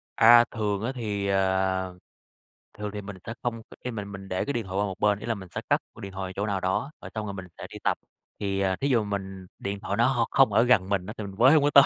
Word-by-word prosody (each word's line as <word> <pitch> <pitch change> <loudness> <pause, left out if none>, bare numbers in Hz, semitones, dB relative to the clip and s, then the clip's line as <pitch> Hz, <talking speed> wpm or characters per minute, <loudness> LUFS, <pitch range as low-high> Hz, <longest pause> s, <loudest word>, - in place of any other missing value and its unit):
À, 120 +1 +8
thường 105 -3 -1
á 120 - 0
thì, 105 -5 -2
ờ, 95 -1 +1 0.8
thường 105 0 -3
thì 105 - -4
mình 100 -1 -8
sẽ 115 - -4
không 115 -2 -2 0.2
khi 125 - -3
mà 105 -3 -4
mình 100 -1 -8
để 95 -1 -1
cái 140 - -1
điện 115 -3 -2
thoại 95 0 -4
qua 100 - +2
một 95 -1 -5
bên, 105 -1 +3
ý - - -7
là, 115 -1 0
mình 95 -3 -9
sẽ - - -1
cất - - +3 0.2
điện 100 - -6
thoại 95 -1 -4
ở - - -8
chỗ 100 - -1
nào 100 -2 0
đó, 95 +10 0
rồi - - -8
xong 110 -1 -2
rồi 100 - -4
mình 95 -1 -7
sẽ - - -7
đi - - -8
tập. - - +2 0.4
Thì, 100 -1 -1
à, 95 -1 +2
thí 140 - +2
dụ 115 -5 +3
mình 95 -2 -4
điện 100 0 -3
thoại 100 0 -3
nó 120 - +5
hông 120 -3 +2
không 135 -1 +5
ở - - +6
gần 110 -7 +4
mình 100 -3 0
á 105 - -6
thì 110 - -4
mình 100 -1 -7
với 125 +4 +7
hông 150 - +5
có 145 - +4
tới, 140 - +10
100 Hz, 295 wpm, -27 LUFS, 95-115 Hz, 0.8 s, tới